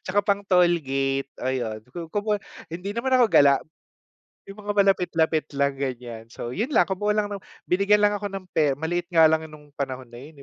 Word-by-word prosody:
Tsaka 200 Hz, +2 st, +1 dB
pang-toll 190 Hz, -4 st, +3 dB
gate, 135 Hz, 0 st, -1 dB
ayon, 120 Hz, -4 st, -2 dB, 0.3 s
kumbaga 210 Hz, 0 st, -1 dB, 0.2 s
hindi 180 Hz, +5 st, -5 dB
naman 235 Hz, +4 st, -2 dB
ako 250 Hz, -, +5 dB
gala. 140 Hz, -1 st, +6 dB, 0.9 s
Yung 195 Hz, -, -11 dB
mga 205 Hz, -, -1 dB
malapit-lapit 175 Hz, -5 st, +2 dB
lang 140 Hz, -1 st, 0 dB
ganiyan. 120 Hz, -4 st, -5 dB
So, 120 Hz, +1 st, -7 dB
yun 225 Hz, -, -3 dB
lang, -, -, +4 dB
kumuha 205 Hz, +2 st, 0 dB
lang 210 Hz, -1 st, 0 dB
ng 200 Hz, -, -4 dB, 0.3 s
binigyan 200 Hz, +3 st, +3 dB
lang 205 Hz, 0 st, +3 dB
ako 205 Hz, -, -4 dB
ng 185 Hz, -2 st, -7 dB
pera, 150 Hz, -3 st, +2 dB
maliit 170 Hz, +4 st, -2 dB
nga 160 Hz, -1 st, +7 dB
lang 160 Hz, 0 st, 0 dB
nung 150 Hz, -1 st, -15 dB
panahon 130 Hz, -3 st, -4 dB
na 120 Hz, -, -11 dB
yun 140 Hz, +2 st, -13 dB
160 Hz, 185 wpm, -24 LUFS, 135-200 Hz, 0.9 s, nga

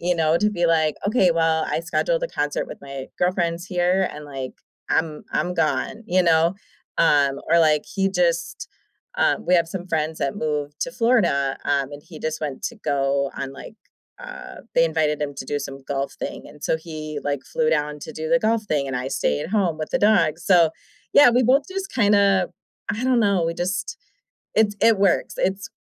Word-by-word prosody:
you 175 Hz, +1 st, +1 dB
know, 160 Hz, 0 st, +2 dB
to 210 Hz, -, +2 dB
be 175 Hz, -4 st, -1 dB
like, 160 Hz, -2 st, +2 dB
"Okay, 200 Hz, -5 st, +3 dB
well, 160 Hz, -1 st, +2 dB
I -, -, -1 dB
scheduled -, -, 0 dB
a -, -, +1 dB
concert -, -, -2 dB
with -, -, -9 dB
my 135 Hz, -1 st, -8 dB
girlfriends 175 Hz, -1 st, 0 dB
here, 180 Hz, +1 st, +1 dB
and, 150 Hz, 0 st, -9 dB
like, 135 Hz, -3 st, -6 dB, 0.4 s
I'm 160 Hz, -2 st, 0 dB
I'm 180 Hz, -, 0 dB
gone," 170 Hz, +7 st, -1 dB
you 185 Hz, +1 st, +3 dB
know, 165 Hz, +1 st, +3 dB, 0.4 s
um, 140 Hz, -3 st, +3 dB
or, 170 Hz, -, +6 dB
like, 155 Hz, -2 st, +3 dB
he 195 Hz, -1 st, 0 dB
just 175 Hz, -2 st, -1 dB, 0.5 s
Um, -, -, +2 dB
we 180 Hz, -, +1 dB
have 170 Hz, -1 st, +3 dB
some 180 Hz, 0 st, -6 dB
friends 160 Hz, -2 st, -1 dB
that 140 Hz, -, -1 dB
moved 150 Hz, -3 st, -3 dB
to 255 Hz, -, -1 dB
Florida, 190 Hz, -, +2 dB
um, 140 Hz, 0 st, 0 dB
and 145 Hz, 0 st, -9 dB
he 165 Hz, -2 st, -12 dB
just 155 Hz, 0 st, -3 dB
went 145 Hz, -3 st, -4 dB
to 240 Hz, -, -4 dB
go 140 Hz, -6 st, 0 dB
on, 135 Hz, 0 st, -4 dB
like, 175 Hz, -, -11 dB, 0.4 s
uh -, -, -9 dB, 0.2 s
they 165 Hz, -, +5 dB
invited 155 Hz, -2 st, 0 dB
him 145 Hz, -1 st, -3 dB
to 135 Hz, -, -6 dB
do 145 Hz, -, -1 dB
some 135 Hz, -1 st, -7 dB
golf 140 Hz, 0 st, -3 dB
thing, -, -, -6 dB
and 150 Hz, -, -16 dB
so -, -, +1 dB
he, 155 Hz, -2 st, -7 dB
like, 145 Hz, -2 st, -2 dB
flew 155 Hz, -1 st, 0 dB
down 150 Hz, -1 st, 0 dB
to -, -, -8 dB
do 155 Hz, 0 st, -5 dB
the 250 Hz, -, +5 dB
golf 225 Hz, -1 st, +1 dB
thing, 145 Hz, -8 st, -1 dB
and 135 Hz, -, -4 dB
I 130 Hz, +1 st, -3 dB
stayed 75 Hz, -, 0 dB
at -, -, -6 dB
home 185 Hz, -7 st, +1 dB
with 155 Hz, -, -4 dB
the -, -, +1 dB
dogs, 180 Hz, -6 st, +3 dB
so 175 Hz, -4 st, +5 dB, 0.4 s
Yeah, 285 Hz, -4 st, +8 dB
we 250 Hz, +2 st, +3 dB
both 265 Hz, +4 st, +4 dB
just 385 Hz, 0 st, -5 dB
kinda 200 Hz, -4 st, +3 dB, 0.4 s
I 225 Hz, +3 st, -3 dB
don't 255 Hz, -2 st, +3 dB
know, 200 Hz, -5 st, +2 dB
we 165 Hz, 0 st, -1 dB
just 190 Hz, +3 st, -3 dB, 0.6 s
it's 210 Hz, -2 st, +3 dB
it 225 Hz, -3 st, +5 dB
works, 195 Hz, -2 st, +2 dB
it's 195 Hz, +1 st, -1 dB
165 Hz, 205 wpm, -23 LUFS, 150-195 Hz, 0.6 s, Yeah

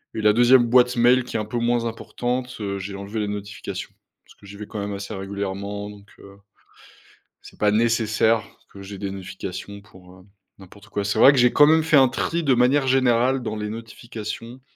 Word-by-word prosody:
et 110 Hz, -, -3 dB
la 105 Hz, -, +5 dB
2e 120 Hz, +2 st, +5 dB
boîte 125 Hz, +1 st, +4 dB
mail, 125 Hz, +2 st, +4 dB
qui 125 Hz, -, -10 dB
est -, -, +1 dB
un 105 Hz, -, -3 dB
peu 115 Hz, +3 st, -5 dB
moins 120 Hz, 0 st, 0 dB
importante, 125 Hz, +2 st, -4 dB
heu, 100 Hz, -1 st, -3 dB
j'ai 100 Hz, +1 st, -6 dB
enlevé 100 Hz, +3 st, -6 dB
les 105 Hz, -, -2 dB
notifications 105 Hz, +1 st, -6 dB, 0.3 s
parce -, -, -19 dB
que 100 Hz, -, -18 dB
j'y 100 Hz, +1 st, -11 dB
vais 105 Hz, -, -7 dB
quand 105 Hz, -, -7 dB
même 100 Hz, 0 st, -4 dB
assez 100 Hz, +2 st, -6 dB
régulièrement, 100 Hz, +1 st, -5 dB
donc 100 Hz, 0 st, -16 dB
heu, 100 Hz, 0 st, -15 dB, 1.1 s
c'est -, -, -15 dB
pas 105 Hz, -, +3 dB
nécessaire 110 Hz, 0 st, +2 dB, 0.3 s
que 100 Hz, -, -11 dB
j'ai 100 Hz, 0 st, -9 dB
des 100 Hz, 0 st, -4 dB
notifications 95 Hz, +1 st, -8 dB
pour, 95 Hz, -3 st, -18 dB
heu, 90 Hz, -, -18 dB, 0.3 s
n'importe 100 Hz, +2 st, -16 dB
quoi. 100 Hz, -2 st, -3 dB
C'est 100 Hz, -, -1 dB
vrai -, -, +8 dB
que 135 Hz, -, 0 dB
j'ai 125 Hz, 0 st, +4 dB
quand 145 Hz, -, +6 dB
même 160 Hz, +1 st, +4 dB
fait 160 Hz, -1 st, +3 dB
un 135 Hz, -2 st, +6 dB
tri, 170 Hz, +6 st, -2 dB
de 140 Hz, -, +2 dB
manière 130 Hz, +3 st, +2 dB
générale, 130 Hz, 0 st, +2 dB
dans 110 Hz, -, -4 dB
les 105 Hz, 0 st, -4 dB
notifications 115 Hz, +1 st, -8 dB
110 Hz, 210 wpm, -22 LUFS, 100-125 Hz, 1.1 s, vrai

